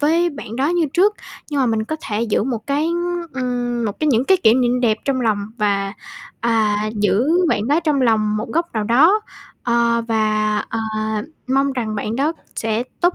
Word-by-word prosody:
với 335 Hz, +4 st, +2 dB
bạn 235 Hz, -6 st, -8 dB
đó 270 Hz, +3 st, +1 dB
như 345 Hz, -1 st, +1 dB
trước, 400 Hz, +5 st, +4 dB, 0.4 s
nhưng 290 Hz, -2 st, 0 dB
mà 260 Hz, -, +3 dB
mình 225 Hz, -2 st, 0 dB
có 315 Hz, -, -4 dB
thể 215 Hz, +1 st, -2 dB
giữ 220 Hz, -3 st, +1 dB
một 235 Hz, -4 st, -3 dB
cái, 290 Hz, +2 st, 0 dB
ưm, 345 Hz, 0 st, -2 dB
ừm, 245 Hz, -2 st, -2 dB
một 205 Hz, -2 st, -4 dB
cái 310 Hz, -, +2 dB
những 245 Hz, -2 st, +3 dB
cái 380 Hz, +6 st, +4 dB
kỉ 220 Hz, -, +7 dB
niệm 250 Hz, 0 st, +2 dB
đẹp 225 Hz, -3 st, +2 dB
trong 270 Hz, -2 st, 0 dB
lòng 220 Hz, -4 st, +1 dB, 0.2 s
và, 200 Hz, -2 st, 0 dB, 0.5 s
à, 220 Hz, -3 st, +2 dB, 0.2 s
giữ 210 Hz, +6 st, +2 dB, 0.2 s
bạn 210 Hz, -3 st, 0 dB
đó 295 Hz, +4 st, +3 dB
trong 305 Hz, -4 st, +1 dB
lòng 215 Hz, -3 st, +2 dB
một 215 Hz, +3 st, -4 dB
góc 335 Hz, +1 st, -1 dB
nào 215 Hz, -2 st, 0 dB
đó, 310 Hz, -, +5 dB, 0.4 s
ờ, 235 Hz, -1 st, +2 dB
và, 215 Hz, -1 st, +1 dB
ờ, -, -, -3 dB, 0.7 s
mong 275 Hz, +1 st, +2 dB
rằng 230 Hz, -4 st, -3 dB
bạn 215 Hz, +2 st, -3 dB
đó 290 Hz, +5 st, +1 dB, 0.2 s
sẽ 225 Hz, +1 st, -1 dB, 0.2 s
tốt 350 Hz, 0 st, +3 dB
245 Hz, 200 wpm, -20 LUFS, 220-295 Hz, 0.7 s, kỉ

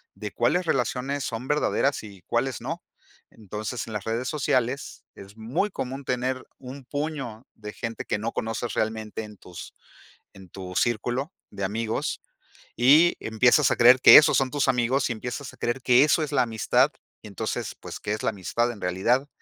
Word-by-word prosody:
de 105 Hz, -1 st, -6 dB
cuáles 175 Hz, +10 st, +1 dB
relaciones 135 Hz, 0 st, -1 dB
son 120 Hz, +1 st, -5 dB
verdaderas 145 Hz, -2 st, +1 dB
y 100 Hz, -3 st, -12 dB
cuáles 120 Hz, +5 st, -1 dB
no. 165 Hz, +8 st, -5 dB, 0.5 s
Entonces, 110 Hz, +3 st, -6 dB
en 110 Hz, -, -7 dB
las 105 Hz, -2 st, -3 dB
redes 115 Hz, +3 st, -2 dB
sociales, 135 Hz, -3 st, -1 dB
es 100 Hz, +1 st, -13 dB
muy 130 Hz, -, -1 dB
común 135 Hz, -3 st, -5 dB
tener 130 Hz, +1 st, -2 dB
un 130 Hz, +1 st, -10 dB
puño 135 Hz, -5 st, -5 dB
de 105 Hz, -1 st, -9 dB
gente 115 Hz, -2 st, -5 dB
que -, -, -1 dB
no 115 Hz, +2 st, -3 dB
conoces 115 Hz, 0 st, -3 dB
realmente 110 Hz, 0 st, -2 dB
en 105 Hz, -1 st, -11 dB
tus 90 Hz, -2 st, -11 dB, 0.6 s
en 95 Hz, -1 st, -14 dB
tu 90 Hz, 0 st, -8 dB
círculo 120 Hz, -, 0 dB, 0.2 s
de 100 Hz, -, -5 dB
amigos. 110 Hz, +3 st, -2 dB, 0.6 s
Y 150 Hz, +8 st, +5 dB
empiezas 120 Hz, +5 st, +3 dB
a -, -, +2 dB
creer 125 Hz, +2 st, +7 dB
que -, -, +11 dB
esos 150 Hz, -, +6 dB
son 130 Hz, -1 st, +1 dB
tus 145 Hz, -2 st, 0 dB
amigos 125 Hz, +1 st, +1 dB
y -, -, 0 dB
empiezas 125 Hz, +4 st, -6 dB
a -, -, -17 dB
creer 120 Hz, +3 st, -2 dB
que 125 Hz, +1 st, +5 dB
eso 155 Hz, +2 st, +3 dB
es 150 Hz, -, -4 dB
la 140 Hz, -, +4 dB
amistad. 120 Hz, +4 st, +2 dB, 0.3 s
Entonces, 100 Hz, -3 st, -4 dB
pues, -, -, -8 dB
¿qué 105 Hz, -, -3 dB
es 110 Hz, -, -4 dB
la -, -, +1 dB
amistad 110 Hz, +4 st, -1 dB
en 110 Hz, -, -11 dB
realidad? 115 Hz, +10 st, +1 dB
120 Hz, 180 wpm, -25 LUFS, 110-135 Hz, 0.6 s, que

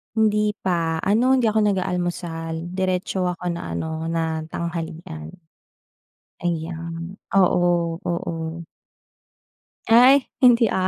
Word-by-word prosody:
Hindi 210 Hz, -1 st, +2 dB
pa, 170 Hz, -3 st, 0 dB
ano 240 Hz, +6 st, +3 dB
hindi 255 Hz, -, +1 dB
ako 220 Hz, -, +2 dB
nag-aalmusal 175 Hz, -4 st, -2 dB
diretso 185 Hz, 0 st, -1 dB
ako 180 Hz, 0 st, -2 dB
na 85 Hz, -, -5 dB
ano 160 Hz, -, -3 dB
na 160 Hz, -1 st, -2 dB
tanghalian. 165 Hz, -, -6 dB, 1.1 s
Ayan, 165 Hz, +1 st, -4 dB, 0.2 s
oo, 175 Hz, -3 st, +2 dB
oo. 165 Hz, -1 st, -4 dB, 1.2 s
Ay, 250 Hz, +4 st, +7 dB, 0.2 s
hindi, 245 Hz, -2 st, +6 dB
ah, 185 Hz, 0 st, +1 dB
175 Hz, 100 wpm, -23 LUFS, 165-195 Hz, 1.2 s, Ay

